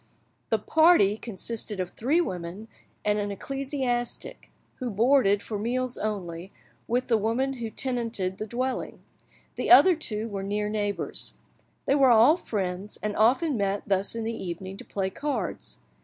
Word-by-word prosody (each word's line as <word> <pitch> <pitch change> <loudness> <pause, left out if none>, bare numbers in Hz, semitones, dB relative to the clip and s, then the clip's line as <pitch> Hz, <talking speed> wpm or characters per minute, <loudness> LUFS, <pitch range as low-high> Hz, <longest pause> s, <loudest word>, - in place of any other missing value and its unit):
The - - +3
party 315 - +4
consisted 220 -1 -4
of 180 -1 -3
three 280 +9 +1
women 185 - -5 0.4
and 210 0 +2
an 205 0 -2
ecclesiastic, 260 +2 -3 0.3
who 255 - -3
boarded, 215 -2 +3
for 210 -2 -4
meals 250 +3 -1
only, 190 -4 -4 0.4
with 250 +2 0
the 230 -3 +3
woman 240 +6 0
who 225 - -3
tenanted 230 -7 -1
the 215 - -4
dwelling; 255 +3 -3 0.5
the - - -1
other 370 -2 +8
two 220 -8 -3
were 200 -3 -4
near 205 +1 -2
neighbours. 205 -1 -3 0.5
They - - +3
were 275 -2 +5
all 235 +6 +7
friends, 195 - -4
and 210 -1 -1
often 265 - +3
met 200 -2 -1
thus 195 +2 0
in 230 - -3
the 225 +1 -2
evening 190 -1 -6
to - - -10
play 190 -1 -2
cards. 255 - -4
220 Hz, 155 wpm, -27 LUFS, 200-255 Hz, 0.5 s, other